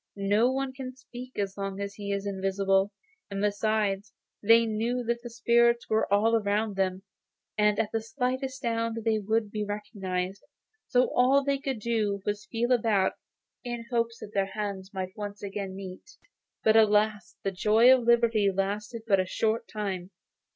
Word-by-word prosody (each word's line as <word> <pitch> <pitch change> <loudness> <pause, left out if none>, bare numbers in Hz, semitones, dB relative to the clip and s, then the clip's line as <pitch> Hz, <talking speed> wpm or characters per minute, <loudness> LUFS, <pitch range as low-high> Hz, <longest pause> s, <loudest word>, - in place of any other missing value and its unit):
No 205 +4 +2
one 265 0 -2
can 260 -1 -7
speak 255 -1 -11
as 200 -1 -3
long 195 0 -3
as 200 0 -4
he 200 -1 -5
is 200 0 -2
invisible, 195 0 +1 0.4
and 200 -1 -4
besides, 205 -1 0 0.3
they 230 +2 +6
knew 230 +3 -1
that 235 0 -1
the 240 - -7
spirits 235 0 +3
were 220 -2 +1
all 215 +3 +4
around 210 -1 0
them, 190 0 -1 0.5
and 210 -1 +3
at 225 -2 0
the 225 - -1
slightest 260 +3 -3
sound 230 -1 -1
they 220 -1 +2
would 215 +1 0
be 210 -1 -2
recognised; 200 -3 -4 0.4
so 250 0 +2
all 265 +3 +4
they 280 0 0
could 270 -3 -3
do 210 -3 0
was 205 0 -1
to 195 - -19
feel 240 +2 -1
about 220 -6 +3 0.5
in 240 -1 -4
the 240 - -5
hope 230 0 +3
that 210 - -10
their 195 -1 +1
hands 195 -1 -5
might 190 -1 -5
once 205 -1 -6
more 200 0 -4
meet. 190 - -9 0.5
But, 220 - +4
alas! 210 -3 +3
the 195 - 0
joy 220 +6 +5
of 255 - -1
liberty 230 -3 +4
lasted 210 +4 -3
but 200 -4 +3
a 185 - +1
short 220 +4 0
time. 190 -4 -4
210 Hz, 175 wpm, -28 LUFS, 200-235 Hz, 0.5 s, they